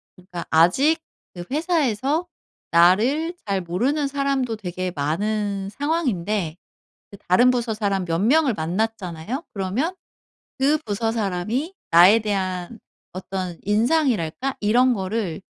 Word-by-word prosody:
그러니까 180 -1 -8
아직 185 - +4 0.3
그 175 - -7
회사에서 300 - 0 0.4
나를 235 - +3
잘 195 -2 -1
모르는 250 - 0
사람도 275 -4 -1
되게 185 -2 -4
많은 200 +6 -1
상황인데 210 - -1 0.5
그 200 - -11
다른 240 +8 +5
부서 240 -2 -1
사람 200 -3 -1
몇 165 0 -1
명을 270 +5 +3
만났잖아요. 190 - -3
그러면 215 - -2 0.6
그 285 +3 +3
부서 225 +2 -1
사람이 225 - -2 0.2
나에 180 +7 +7
대한 190 -1 -3 0.3
어떤 185 -2 -5
인상이랄까 240 - +1
이런 245 +5 +3
거를 195 -3 -3
210 Hz, 260 characters per minute, -22 LUFS, 185-265 Hz, 0.6 s, 나에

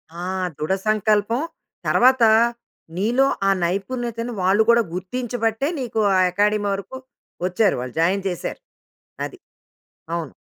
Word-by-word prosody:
ఆ! 175 - -6 0.3
దృఢ 155 +5 -1
సంకల్పం. 215 +3 +2 0.5
తర్వాత 255 0 +4 0.7
నీలో 235 +7 +2 0.2
ఆ - - +5
నైపుణ్యతను 230 +6 -2
వాళ్ళు 195 +4 +4
కూడా 235 0 +6
గుర్తించబట్టే 230 +5 -2
నీకు 230 -3 -3 0.2
ఆ - - +4
అకాడమీ 205 +2 +1
వరకు 195 +6 -6 0.5
వచ్చారు 190 +3 +2
వాళ్ళు 125 -1 -7
జాయిన్ 185 +4 +2
చేసారు. 175 - -5 0.7
అది. - - -9 0.8
అవును. 160 -6 -4
215 Hz, 115 wpm, -22 LUFS, 185-235 Hz, 0.8 s, కూడా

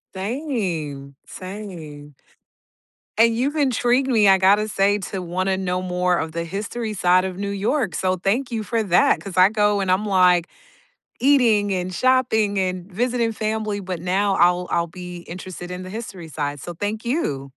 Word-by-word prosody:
Same, 190 - -3
same. 175 -7 -9 1.0
And 230 0 +4
you've 280 +5 0
intrigued 260 -2 +2
me, 220 -5 +4
I 190 -1 +6
gotta 205 +3 +4
say, 205 0 +2
to 190 -2 -3
wanna 185 +2 -1
know 185 -1 -2
more 180 -1 +1
of 160 0 -3
the 170 +1 -3
history 215 +5 -4
side 180 +1 +3
of 185 -1 -5
New 200 0 -3
York, 205 - -1
so 185 +4 0
thank 235 +8 -1
you 220 -2 -2
for 230 +1 -1
that, 180 -5 +3
'cause 195 -2 -8
I 185 +1 +7
go, 210 -1 +2
and 185 -1 0
I'm 190 +3 +1
like, 180 -3 +4 0.7
eating, 235 -7 +4
and 185 0 -3
shopping, 220 -5 +2
and 185 0 -2
visiting 235 +3 0
family, 215 -1 -2
but 185 -3 -5
now 195 +3 +1
I'll 180 +1 +3
I'll 170 0 0
be 180 0 -7 0.2
interested 180 -1 -8
in 180 0 -6
the 185 - -8
history 190 -6 -7
side, 145 -1 -3
so, 175 - -7
thank 210 +6 -4
you. 235 - -1
195 Hz, 170 wpm, -22 LUFS, 180-220 Hz, 1.0 s, I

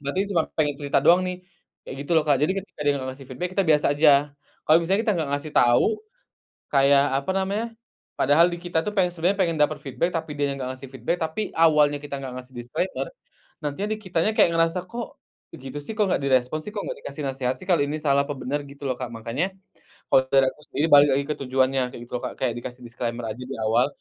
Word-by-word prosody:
Berarti 140 +7 -1
cuma 165 -4 +3
pengen 150 -2 +1
cerita 145 -1 +1
doang 175 +2 +6
nih, 180 0 -5 0.4
kayak - - -7
gitu - - -12
loh, 160 - +5
Kak. 145 - +4
Jadi 160 - +3
ketika 195 -4 -11
dia 145 - +4
nggak 130 - -5
ngasih 130 0 -11
feedback 175 +8 -4
kita 195 -1 +2
biasa 150 -2 +4
aja. 150 +1 +6 0.6
Kalo 155 - +6
misalnya 190 +5 +1
kita 215 - +2
nggak 155 -4 -1
ngasih 145 +2 -3
tau, 120 0 +5 0.9
kayak, 140 0 +5 0.2
apa 165 - -3
namanya, 195 +4 -1 0.5
padahal 145 +5 +5
di 175 - -4
kita 170 -2 -1
tuh 210 - -3
pengen 180 -2 +3
sebenernya 180 +4 0
pengen 175 -4 +2
dapet 150 0 +1
feedback 145 +6 -2
tapi 165 -2 -4
dia 145 -1 0
nya - - -2
nggak 130 -1 -4
ngasih 130 +1 -11
feedback, 130 +6 -2
tapi 160 +6 -2
awalnya 150 -3 +4
kita 140 -1 -5
nggak 135 -2 -6
ngasih 130 0 -9
disclaimer, 120 +10 -3 0.6
nantinya 150 +8 -2
di 215 - -1
kitanya 185 -1 0
kayak 170 - +5
ngerasa, 165 +2 +1
"Kok, 235 +5 -7 0.3
begitu 135 +2 -8
sih? 210 +9 -8
Kok 210 - +3
nggak - - 0
direspon 130 +2 +1
sih? 185 - -7
Kok 210 -1 -4
nggak - - -5
dikasih 140 +1 -7
nasehat 130 -1 -1
sih? 185 - -12
Kalo 175 -6 +3
ini 145 +2 -1
salah 140 -2 +2
apa 145 - -3
bener," 140 +3 -2
gitu 140 0 -10
loh, 130 - 0
Kak. 125 0 -6
Makannya 120 +12 -3 0.5
kalo 130 0 +5
dari 135 0 +4
aku - - -23
sendiri 155 +3 0
balik 145 0 +8
lagi 140 - +1
ke - - -1
tujuannya, 130 0 +1
kayak 120 - -9
gitu 120 - -17
loh, - - -15
Kak, - - -7
kayak 120 - +1
dikasih 125 +1 -8
disclaimer 120 0 -4
aja 110 - -8
di 130 +2 -6
awal, 115 +4 +3
145 Hz, 230 wpm, -24 LUFS, 130-170 Hz, 0.9 s, balik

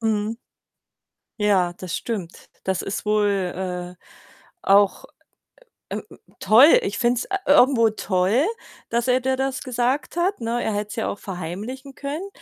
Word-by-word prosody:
Mhm. 220 0 -1 1.0
Ja, 190 -4 +2
das 180 -1 -5
stimmt. 200 -8 -6
Das 190 -1 -1
ist 195 +2 -4
wohl, 210 -1 +2 0.7
äh, - - -33 0.6
auch, 200 - +3 0.9
äh, - - -3
ähm, - - -14 0.2
toll. 255 +9 +7
Ich 200 - -3
finde 245 -1 +2
es, - - -3
äh, 390 - -2
irgendwo 255 -5 +5
toll, 200 - +1 0.4
dass 235 +1 0
er 255 0 +3
dir 260 +1 0
das 265 0 -2
gesagt 255 +5 -1
hat, 365 -3 0
ne? 235 +1 -1
Er 220 - -1
hätte 205 0 -3
es - - -7
ja 225 - -2
auch 200 - -5
verheimlichen 205 - -6
können, 300 +7 -5
230 Hz, 155 wpm, -23 LUFS, 205-260 Hz, 1.0 s, toll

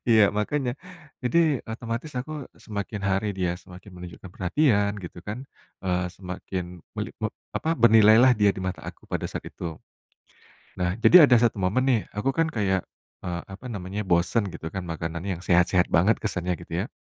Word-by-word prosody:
Iya, 110 -2 +7 0.2
makanya. 125 +4 0 0.5
Jadi 125 +7 +2 0.3
otomatis 115 +5 -4
aku 130 +5 -5 0.3
semakin 105 -1 -4
hari 95 +2 +1
dia 90 -2 +1
semakin 90 +2 -13
menunjukkan 90 +1 -10
perhatian 100 - +2
gitu 90 -1 -9
kan, 105 - -3 0.5
eee, 90 0 +1
semakin 90 0 -5 0.3
melipop - - -4 0.2
apa, - - -3
bernilailah 110 +2 +7
dia 105 -1 +6
di - - -5
mata 95 - -3
aku - - -11
pada - - -1
saat - - -5
itu. - - -10 1.1
Nah, 90 -1 +1
jadi - - +8
ada 125 - +5
satu 115 -3 +2
momen 100 +8 +2
nih 120 -4 +3 0.2
aku 105 +6 +1
kan 165 - +4
kayak, 95 -2 +2 0.5
eee, 85 -1 -2
apa 95 - -11
namanya, 95 +1 -4
bosan 90 +5 +2
gitu - - -7
kan 95 - -3
makanan 80 0 -4
yang 95 -4 -3
sehat-sehat 90 0 +3
banget 95 +6 +4
kesannya 90 0 -1
gitu 85 - -12
ya. - - -22
100 Hz, 165 wpm, -26 LUFS, 90-115 Hz, 1.1 s, jadi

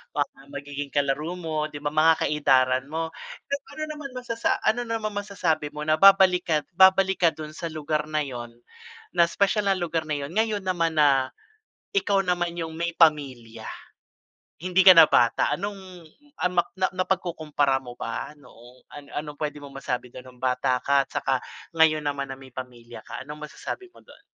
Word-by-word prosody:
mga - - -2
magiging 145 0 -6
kalaro 145 +5 0
mo, 155 -2 -2
'di 145 - -7
ba, 145 - -1
mga 160 +1 +4
ka-edaran 130 -3 +2
mo, 160 +1 -2 0.4
pero 280 0 -3
ano 310 - -4
naman, 295 -3 -7
masasa 235 -2 -1
ano 240 - +2
naman 220 -2 -2
masasabi 180 -7 -1
mo 150 - -4
na 155 - +4
babalik 190 -2 +6
ka 160 - +2 0.2
babalik 190 +1 +5
ka 165 - +7
dun 155 -1 -8
sa 170 - -4
lugar 155 0 -2
na 155 - +1
yun, 120 -5 -5 0.6
na 170 - +6
'spesyal 200 0 +1
na - - +2
lugar 165 -2 -1
na 155 -1 -3
yun, - - -12
ngayon 220 -2 +1
naman 165 -3 0
na 135 -3 +4 0.6
ikaw 205 - +2
naman 175 -1 -1
yung 160 -1 -4
may 170 +1 -2
pamilya? 130 -8 +1 1.0
Hindi 185 +1 +2
ka 185 - +11
na 165 -2 +9
bata, 120 -1 +3
anong, 190 -3 -7 0.3
ano 180 -1 +2 0.2
na 185 - +2
napag-kukumpara 160 -7 0
mo 120 -1 -10
ba 115 +5 -4
noong 125 -2 -18
ano-anong 145 +1 -7
pwede 150 -1 -3
mo 140 - -10
masabi 125 -2 -4
dun 130 - -9
nung 125 -1 -15
bata 125 0 +1
ka 140 0 +4
at - - -45
saka 130 -2 -1 0.3
ngayon 160 -1 +4
naman 140 -1 -2
na 135 - -6
may 130 -2 -14
pamilya 120 -3 -9
ka, - - -7
anong 150 +1 -8
masasabi 375 -1 -7
mo - - -17
dun? - - -17
155 Hz, 180 wpm, -25 LUFS, 135-185 Hz, 1.0 s, ka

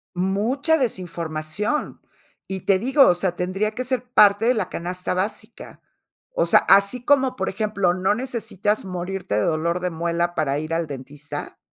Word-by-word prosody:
Mucha 220 - +1
desinformación. 175 - -3 0.5
Y 190 -1 -5
te 190 -2 +2
digo, 270 +4 +5
o - - +6
sea, 175 0 -2
tendría 190 +4 -1
que 245 +4 -4
ser 255 -1 -1
parte 205 -1 +5
de 245 - +4
la 190 -4 -1
canasta 180 +2 -4
básica. 190 +4 -5 0.5
O - - +1
sea, - - +6
así 200 +5 +4
como, 265 -1 +3
por 190 - -2
ejemplo, 200 -3 0
no 185 +3 +1
necesitas 215 -4 -2
morirte 180 - -4
de 105 - +2
dolor 170 +4 0
de 180 - -1
muela 170 +1 -1
para 145 -3 0
ir 155 +2 -4
al 165 -1 -1
dentista, 145 +1 -8
190 Hz, 165 wpm, -22 LUFS, 170-215 Hz, 0.5 s, o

